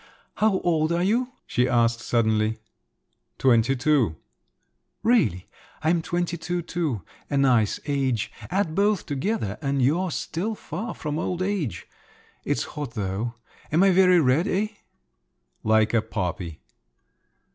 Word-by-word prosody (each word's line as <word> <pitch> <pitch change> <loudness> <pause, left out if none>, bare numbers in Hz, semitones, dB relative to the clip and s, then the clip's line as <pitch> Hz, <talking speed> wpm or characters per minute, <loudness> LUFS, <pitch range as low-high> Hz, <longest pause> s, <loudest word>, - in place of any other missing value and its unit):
"How 210 -3 +3
old 160 -2 +1
are 170 +1 +1
you?" 240 +6 +1
she 125 +1 +1
asked 115 -1 +2
suddenly. 110 -2 +1 0.8
"Twenty 125 0 +3
two." 125 - +2 0.9
"Really? 215 - +2 0.4
I'm 165 +2 +2
twenty 175 +1 -2
two 175 +1 -3
too. 155 - -2 0.3
A 140 - 0
nice 125 -6 +3
age. 135 -6 0 0.2
Add 185 -3 0
both 200 +1 +2
together 140 - -2
and 140 -1 0
you're 160 +9 +2
still 185 +7 -3
far 225 +2 -6
off - - -9
old 160 +4 -1
age. 185 - -2 0.6
It's - - 0
hot, 145 -6 -5
though. 105 +3 -2 0.4
Am 165 +5 +4
I 195 - +6
very 185 -1 +6
red, 150 +5 +3
eh?" 205 +3 0 0.9
"Like 110 0 +3
a 115 - +4
poppy!" 90 -6 -4
150 Hz, 130 wpm, -25 LUFS, 115-180 Hz, 0.9 s, I